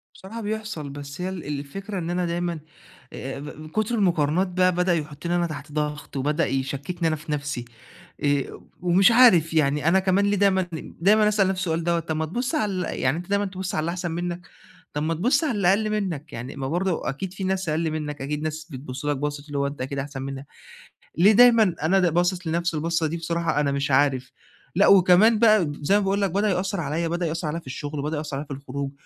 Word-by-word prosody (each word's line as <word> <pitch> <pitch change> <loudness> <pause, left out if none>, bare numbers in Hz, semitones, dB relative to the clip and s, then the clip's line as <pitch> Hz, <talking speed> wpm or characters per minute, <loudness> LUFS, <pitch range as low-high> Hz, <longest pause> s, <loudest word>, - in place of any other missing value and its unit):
بصراحة 220 +5 -8
بيحصل 215 -8 -4
بس 140 +3 -8
هي 185 - -2
ال 185 -3 -6
الفكرة 195 +8 -6
إن 165 - -4
أنا 175 0 0
دايمًا 170 -1 -2 0.5
آآ 135 +1 -5
آآ - - -7
ب 150 +2 -9
كتر 215 +4 0
المقارنات 175 -3 +2
بقى 185 0 +2
بدأ 180 0 +2
يحطني 155 +2 -3
أنا 175 -1 +1
تحت 155 -2 -8
ضغط 150 -1 -3
وبدأ 150 +5 +1
يشككني 140 +6 -2
أنا 160 - +1
في 155 +1 -8
نفسي، 145 -4 -3 0.6
آآ 145 -2 +1
و - - -12 0.2
ومش 180 +5 +5
عارف 185 -10 +6
يعني 150 -1 +2
أنا 190 +3 +5
كمان 190 +1 +2
ليه 200 0 +1
دايمًا 195 -1 +3
ل 160 - -7
دايمًا 210 +4 +5
أسأل 210 -2 +3
نفسي 190 -1 -1
السؤال 165 -2 -1
دَوّة 170 0 +1
طب 160 -1 -4
ما 160 +1 -1
تبص 245 - -2
على 210 -7 0
ال 185 -1 -3
يعني 130 +5 +1
أنت 175 +2 -7
دايمًا 200 0 +1
تبص 190 -1 -4
على - - +1
اللي 160 +2 -1
احسن 175 -1 -3
منّك، 175 +1 -4 0.5
طب 150 - -2
ما 165 +2 0
تبص 255 - +2
على 295 - +1
اللي 185 -3 +2
أقل 215 +2 +2
منّك 170 -8 -3
يعني 120 +4 -7
ما 135 -1 -3
برضه 175 -2 -1
أكيد 175 +8 -4
في 195 0 -5
ناس 190 -2 -1
أقل 160 +1 0
منّك 150 -2 -4
أكيد 150 +2 -3
ناس 155 0 -4
بتبص 130 0 -7
لك 145 -1 0
باصة 145 +1 -3
اللي 145 -1 -4
هو 140 - +1
أنت 140 -1 -6
أكيد 135 +2 -4
احسن 135 -1 -5
منها، 135 +1 -6 0.7
ليه 195 +5 +6
دايمًا 225 -5 +6
أنا 190 +5 +3
د 175 -4 +2
باصص 175 0 +1
لنفسي 170 0 0
البصة 165 +1 0
دي 165 +2 -3
بصراحة 165 -2 -1
أنا 145 -1 +1
مش 140 0 -1
عارف، 130 -1 +2 0.4
لأ 195 - +5
وكمان 200 +4 +6
بقى 215 -5 +5
د 145 -1 -5
زي 200 - +4
ما 205 - +1
باقول 195 +1 0
لك 195 -3 +1
بدأ 205 +3 +1
يأثر 190 0 -1
عليّا 160 +3 -1
بدأ 170 +1 -1
يأثر 165 0 -2
عليّا 155 +3 -2
في 165 - -17
الشغل، 145 +2 -5
وبدأ 150 +2 -2
يأثر 150 -2 -4
عليّا 145 - -6
في 140 - -5
الخروج، 140 0 -5
170 Hz, 230 wpm, -24 LUFS, 145-190 Hz, 0.7 s, عارف